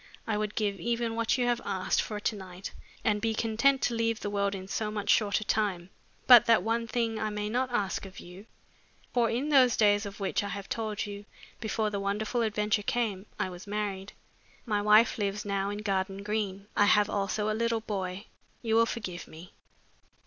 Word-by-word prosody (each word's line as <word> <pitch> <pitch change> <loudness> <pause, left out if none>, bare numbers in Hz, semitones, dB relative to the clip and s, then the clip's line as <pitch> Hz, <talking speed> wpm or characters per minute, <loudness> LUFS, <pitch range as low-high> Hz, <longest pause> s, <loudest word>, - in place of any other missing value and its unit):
I 220 - -1
would 210 0 -2
give 205 -3 -1
even 235 +4 -1
what 230 +2 +1
you 250 - +1
have 240 -1 +1
asked 190 -2 0
for 210 -1 -5
to 210 - -1
night 185 -1 -8 0.3
and 210 -1 +1
be 225 -1 0
content 235 +5 +2
to 240 - +1
leave 230 -1 0
the 205 - -3
world 200 0 0
in 190 -1 -7
so 210 +2 -2
much 210 -1 0
shorter 210 0 +2
time. 195 -4 -1 0.3
But 240 -1 +9
that 230 -1 +5
one 230 +1 0
thing 225 -2 -1
I 215 - -1
may 210 0 -3
not 255 +3 0
ask 200 -5 -1
of 185 - -12
you, 185 +5 -12 0.7
for 235 -2 +3
in 260 +6 -1
those 260 -5 +5
days 205 -1 +3
of 200 +1 -10
which 195 0 0
I - - -3
have 200 0 -6
told 215 -2 -3
you, 205 0 -8 0.3
before 220 -1 -1
the 200 - -2
wonderful 210 +4 -1
adventure 210 -1 +1
came, 210 -3 -2
I 185 - -2
was 180 +3 -10
married. 200 -2 -3 0.5
My 210 -3 0
wife 215 +3 +5
lives 205 0 -2
now 200 -1 -1
in 205 +1 -5
Garden 195 -1 -1
Green. 205 -2 -2
I 205 - +5
have 210 0 +4
also 210 +1 -1
a 215 - +1
little 230 0 0
boy. 195 -2 -4 0.4
You 225 -1 0
will 230 0 +5
forgive 185 -8 -5
me." 160 +3 -13
210 Hz, 200 wpm, -29 LUFS, 200-225 Hz, 0.7 s, But